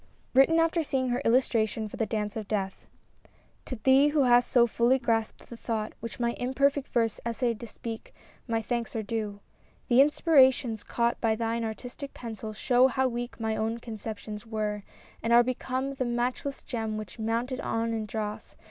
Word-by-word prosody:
JVritten 270 +5 +5
after 330 +1 +3
seeing 265 -4 -1
her 245 +2 0
illmtraiion/or 225 -3 +1
*'The 225 - 0
Dance 210 0 -2
of 215 -2 -5
DeatK^ 195 -3 -1 0.9
TO 255 - -4
thee, 270 +2 +6
who 295 -1 +3
hast 245 -1 +4
so 240 -2 +5
fully 235 +2 +3
grasped 225 -3 -1
the 235 - -9
thought 225 -2 -3
Which 230 +1 -7
my 235 0 +1
imperfect 275 +2 +1
verse 230 -3 0
essayed 235 -1 -1
to 235 - -7
speak, 225 +1 -7 0.4
My 225 -1 0
thanks 235 0 -3
are 220 - -1
due. 210 -1 -4 0.2
— - - -35
The 245 +2 +7
inspirations 265 -6 +4
caught 235 0 0
By 225 -2 +2
thine 230 +1 -1
artistic 245 +5 -6
pencil 220 -2 -6
show 245 +4 +3
how 260 0 +1
weak 240 0 -5
My 220 -1 -1
own 225 +1 -1
conceptions 220 -2 -7
were, 215 -2 -3 0.4
and 230 - -1
are 240 +1 +7
become 255 +2 -2
The 260 -1 -2
matchless 245 +3 -2
gem 225 -3 -3
which, 215 -1 -8
mounted 235 +4 -1
e'en 230 -2 -1
in 220 -1 -3
dross. 210 0 -5
235 Hz, 175 wpm, -28 LUFS, 220-255 Hz, 0.9 s, The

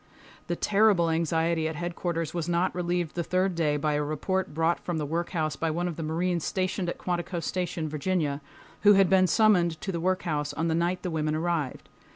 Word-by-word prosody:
The 175 - -1
terrible 200 -4 +3
anxiety 165 0 +1
at 160 - -4
Headquarters 170 0 -3
was 170 -1 -2
not 175 +2 +1
relieved 175 -2 -1
the 170 - -2
third 185 +2 +1
day 155 -3 +1
by 150 +1 0
a 150 - +1
report 185 +6 -2
brought 165 +3 +1
from 175 -2 -3
the 150 - -2
workhouse 160 -1 -2
by 165 +3 -1
one 175 +3 -1
of 170 - -4
the 165 - -6
marines 170 +2 -1
stationed 185 -1 -1
at - - -4
Quantico 175 0 -2
Station, 170 -1 -2
Virginia, 150 -1 -1 0.4
who 205 0 +7
had 195 -2 +4
been 185 -1 +5
summoned 175 -5 +3
to 195 - -3
the 170 - -3
workhouse 165 -4 -1
on 165 +1 -1
the - - +1
night 175 +2 0
the 180 - -2
women 155 -1 0
arrived. 160 -4 -2
170 Hz, 200 wpm, -27 LUFS, 160-180 Hz, 0.4 s, who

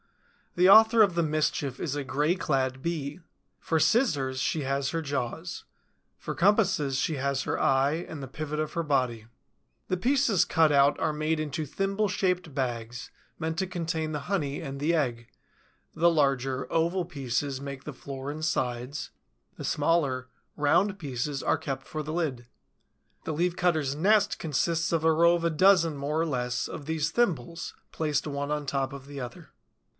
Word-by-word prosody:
The 180 +1 +5
author 220 +3 +8
of 195 -4 +2
the 170 - +2
mischief 150 -3 -1
is 145 -4 -2
a 145 - -2
gray 150 +6 +1
clad 130 -6 -1
Bee. 155 -1 -3 0.4
For 160 - 0
scissors, 145 - +2
she 155 - 0
has 140 +1 -1
her 165 +3 -2
jaws; 145 +4 -4 0.5
for - - -5
compasses, 190 -9 +2
she 155 - 0
has 140 0 -1
her - - -2
eye 140 +5 +2
and 150 - -7
the 135 - -6
pivot 150 +3 -4
of 155 -1 -2
her 170 - -1
body. 125 -7 0 0.6
The 185 - +2
pieces 245 -1 +3
cut 160 -2 +3
out 140 0 +4
are 155 - 0
made 155 +1 -1
into 155 0 -3
thimble 195 +7 -1
shaped 180 -5 -1
bags, 120 -3 -4 0.3
meant 160 0 -2
to 190 - 0
contain 165 -3 -2
the 150 -1 -3
honey 145 -4 -2
and 140 -5 -6
the 155 +4 +1
egg: 120 -7 -1 0.7
the 170 +2 +4
larger, 135 -4 +1
oval 170 +2 +1
pieces 140 -3 -3
make 140 -1 -7
the 150 - -6
floor 135 +1 -7
and 155 +1 -7
sides; 125 -2 -2 0.4
the - - -8
smaller, 145 -5 +1 0.3
round 175 +7 +2
pieces 140 -1 -3
are - - +1
kept 135 -2 -5
for 155 - -4
the 155 - -5
lid. 145 -8 -2 0.8
The 160 - -3
Leaf 175 +3 0
cutter's 155 -7 +1
nest 205 +6 +3
consists 165 +2 0
of 165 -2 +1
a 160 - +5
row 170 +2 +5
of 170 - -3
a - - +3
dozen, 170 -1 +4
more 145 +3 -2
or 165 - +2
less, 125 -4 -1
of 145 - -8
these 160 -2 -1
thimbles, 170 - -1 0.2
placed 150 -2 -1
one 140 0 -3
on 150 -1 -1
top 135 -1 -1
of 140 -1 -9
the 140 -1 -7
other. 120 -2 -9
150 Hz, 175 wpm, -28 LUFS, 135-170 Hz, 0.8 s, author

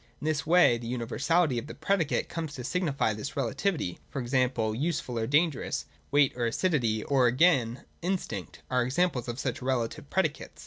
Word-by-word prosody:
In - - -7
this 155 -1 0
way 170 -8 +5
the 115 - -7
universality 125 +4 +1
of 115 - -8
the - - -8
predicate 165 0 0
comes 160 -3 -5
to 125 - -6
signify 145 -9 0
this 110 +8 -6
relativity 135 - -1
— - - -28
(e. - - 0
g. 130 0 +2 0.3
useful, 145 -6 -1
or 110 - -1
dangerous; 150 +2 +1 0.2
weight 145 -1 +4
or 120 -1 0
acidity; 115 - +1
or 135 -3 +3
again, 125 -3 +3 0.2
in 185 +3 +1
stinct; 100 - -7
are 125 -1 +3
examples 130 0 0
of 120 0 -4
such 130 -2 -2
relative 125 -3 -2
predicates). - - -1
135 Hz, 180 wpm, -28 LUFS, 120-160 Hz, 0.3 s, way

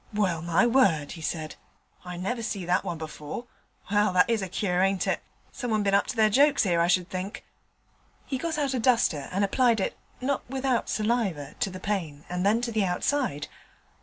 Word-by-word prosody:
'Well, 185 -6 +1
my 170 +5 +3
word,' 195 - +3
he 165 - -8
said, 155 -1 -4 0.5
'I 180 0 -6
never 230 +7 -2
see 200 -4 -3
that 180 +1 +2
one 170 - -3
before. 155 +7 -7 0.5
Well, 205 -1 +3
that 180 0 +5
is 230 -3 +1
a 190 - -4
cure, 180 -1 0
ain't 195 0 +2
it? - - 0 0.3
Someone 220 -4 -1
bin 200 -1 +1
up 200 - +3
to 260 - -3
their 215 -1 +4
jokes 280 +1 +4
'ere, 170 -3 +2
I 170 - +3
should 180 0 +2
think.' 185 +2 -5 0.8
He 265 - -3
got 325 +2 -2
out 280 -3 0
a 255 - 0
duster 225 - +2
and 195 +2 +1
applied 235 +2 +3
it, 190 - -1 0.2
not 270 +2 -1
without 265 -2 0
saliva, 210 - -1
to - - +1
the 185 0 -8
pane 170 -8 -3
and 180 0 -2
then 215 +4 +3
to 240 -1 -2
the 215 -2 +1
outside. 180 - -1
200 Hz, 200 wpm, -27 LUFS, 175-235 Hz, 0.8 s, that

